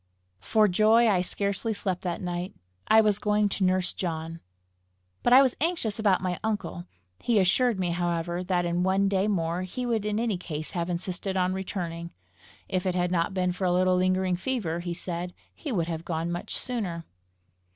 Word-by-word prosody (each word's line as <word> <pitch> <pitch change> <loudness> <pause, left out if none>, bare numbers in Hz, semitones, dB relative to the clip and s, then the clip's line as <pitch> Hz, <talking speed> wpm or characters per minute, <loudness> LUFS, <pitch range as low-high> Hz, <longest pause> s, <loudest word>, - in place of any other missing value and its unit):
For 215 - +3
joy 215 +5 +4
I 195 -5 +3
scarcely 200 +4 -2
slept 185 -3 -2
that 175 0 -3
night: 175 +1 -4 0.3
I 220 +1 +7
was 210 -2 +2
going 210 0 +2
to 195 - -2
nurse 185 0 +2
John! 165 -2 -4 0.8
But 240 - +2
I 260 +2 +9
was 260 -2 +1
anxious 310 - 0
about 195 -4 +2
my 180 -1 -1
uncle. 205 - -3 0.3
He 235 -2 +1
assured 205 +4 +3
me, 180 -2 0
however, 175 0 -1
that 180 -1 0
in 175 +1 0
one 190 +2 +2
day 195 0 +1
more 170 -3 0
he 185 +7 -4
would 230 -3 0
in 210 0 -1
any 225 -6 0
case 155 -3 -5
have 170 0 -2
insisted 185 +2 -2
on 185 0 +1
returning. 175 -3 -4 0.6
If 185 0 -1
it 180 - 0
had 180 -1 +1
not 175 +2 0
been 180 -1 +1
for 180 +1 -3
a 180 - +3
little 185 +1 +3
lingering 185 0 +1
fever, 185 -6 -2
he 175 0 -4
said, 175 0 -5 0.2
he 295 - -6
would 170 -7 0
have 165 -1 -4
gone 165 0 -2
much 175 - -4
sooner. 190 -10 -3
185 Hz, 190 wpm, -27 LUFS, 175-210 Hz, 0.8 s, I